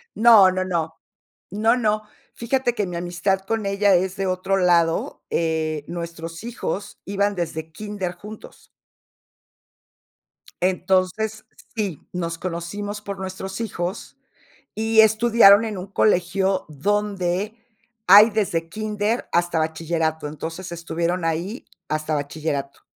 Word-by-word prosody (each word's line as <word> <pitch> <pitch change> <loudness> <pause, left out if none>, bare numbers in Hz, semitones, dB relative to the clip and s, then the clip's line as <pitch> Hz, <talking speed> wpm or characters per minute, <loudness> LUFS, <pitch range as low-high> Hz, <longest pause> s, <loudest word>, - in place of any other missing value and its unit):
No, 215 -5 +7
no, 185 0 -1
no. 165 -3 -2 0.6
No, 220 +4 +3
no. 215 -2 +1 0.3
Fíjate 245 +1 0
que 210 -3 0
mi 175 - -6
amistad 175 +2 -1
con 220 +1 -2
ella 200 -1 +3
es 185 +1 0
de 195 -1 -1
otro 185 +1 0
lado, 170 -3 +2
eh, 155 -2 -1
nuestros 170 +1 -6
hijos 215 -4 -5
iban 200 +1 0
desde 160 -2 -4
kínder 200 -1 -5
juntos. 210 +3 -12 1.9
Entonces, 185 +4 0 0.3
sí, 200 -9 -2
nos 170 -2 -3
conocimos 185 +4 -5
por 200 -1 -6
nuestros 190 +1 -6
hijos 185 -2 -4 0.6
y 220 +1 +1
estudiaron 220 -1 +6
en 210 -3 -4
un 185 +2 -6
colegio 190 -1 +1
donde 200 +4 -1 0.5
hay 205 +4 +9
desde 185 -6 -1
kínder 215 +4 -2
hasta 170 -1 +1
bachillerato. 160 -1 -1
Entonces, 165 +4 -6
estuvieron 170 +1 -2
ahí 170 +8 -3 0.2
hasta 155 0 -1
bachillerato. 145 -1 -4
185 Hz, 120 wpm, -23 LUFS, 170-210 Hz, 1.9 s, hay